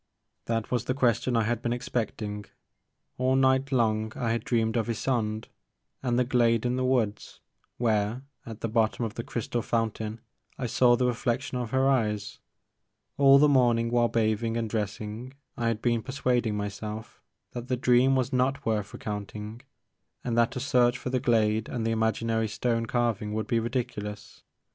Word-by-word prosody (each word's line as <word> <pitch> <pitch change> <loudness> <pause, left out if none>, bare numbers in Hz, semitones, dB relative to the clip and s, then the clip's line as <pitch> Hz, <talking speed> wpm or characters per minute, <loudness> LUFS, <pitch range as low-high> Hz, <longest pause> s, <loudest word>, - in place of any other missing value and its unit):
" - - -52
This 115 -1 -2
was 120 -2 0
the 130 - -1
question 120 -1 +1
that 115 - +4
I - - +1
had 120 +1 -1
been 120 0 -1
expect 120 -3 -3
ing. 105 0 -5 0.7
All 130 +1 +2
night 130 +1 +3
long 110 -3 +1
I 115 -2 -1
had 115 - -1
dreamed 115 -2 0
of 115 -1 0
Ysonde 110 -2 -1 0.6
and 120 -2 0
the 125 - +4
glade 120 -2 +2
in 125 0 +1
the 130 - -1
woods, 120 -5 -1 0.4
where, 110 +1 0 0.2
at 115 -1 -9
the - - -1
bottom 115 +1 +1
of 110 - -5
the 115 - -5
crystal 120 +1 -3
fountain, 110 -1 -2 0.4
I 125 - -3
saw 120 +1 +4
the 125 +1 +1
reflection 125 +2 -1
of 120 -3 -3
her 130 +2 +2
eyes. 105 -6 0 0.8
All 140 -1 +8
the 150 +2 +6
morning 120 -4 +3
while 120 -1 +3
bathing 115 0 0
and 115 -1 -1
dressing 110 +4 -4 0.2
I 115 - -1
had 115 -2 -1
been 120 -2 +2
persuading 125 -4 0
myself 105 +2 -6 0.3
that 120 0 -6
the 130 -1 0
dream 125 +2 +4
was 130 +1 0
not 135 +2 +1
worth 105 -2 -1
recounting 105 -1 -6 0.6
and 120 -2 -1
that 115 -1 +2
a - - -2
search 125 -2 +3
for 125 0 -5
the 130 - +1
glade 110 -3 +2
and 120 -3 -3
the 115 - +1
imaginary 110 0 0
stone 115 +2 -1
carving 115 -4 0
would 110 0 -1
be 115 -2 +1
ridiculous. 110 -3 -4
115 Hz, 180 wpm, -27 LUFS, 110-125 Hz, 0.8 s, All